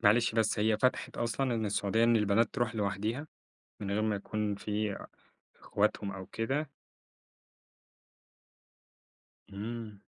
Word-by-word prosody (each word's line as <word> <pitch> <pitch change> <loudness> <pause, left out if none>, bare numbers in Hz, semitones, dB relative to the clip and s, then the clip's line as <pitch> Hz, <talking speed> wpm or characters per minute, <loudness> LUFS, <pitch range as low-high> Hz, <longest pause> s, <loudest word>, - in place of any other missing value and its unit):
معلش 115 +1 +4
بس، 110 -2 +2
هي 110 0 +3
فتحت 130 +2 +1
أصلًا 120 +2 0
إن 110 -2 0
السعودية 105 +2 +2
إن 115 0 +5
البنات 105 +2 +3
تروح 120 -3 0
لوحديها، 105 +7 -1 0.5
من 100 -1 -3
غير 105 +2 +1
ما 110 -2 +1
يكون 105 +1 -2
في 105 0 -2 0.7
أخواتهم 100 -1 +1
أو 95 -1 -7
كده؟ 135 +6 -1 2.8
امم. 105 0 -6
110 Hz, 120 wpm, -32 LUFS, 105-115 Hz, 2.8 s, إن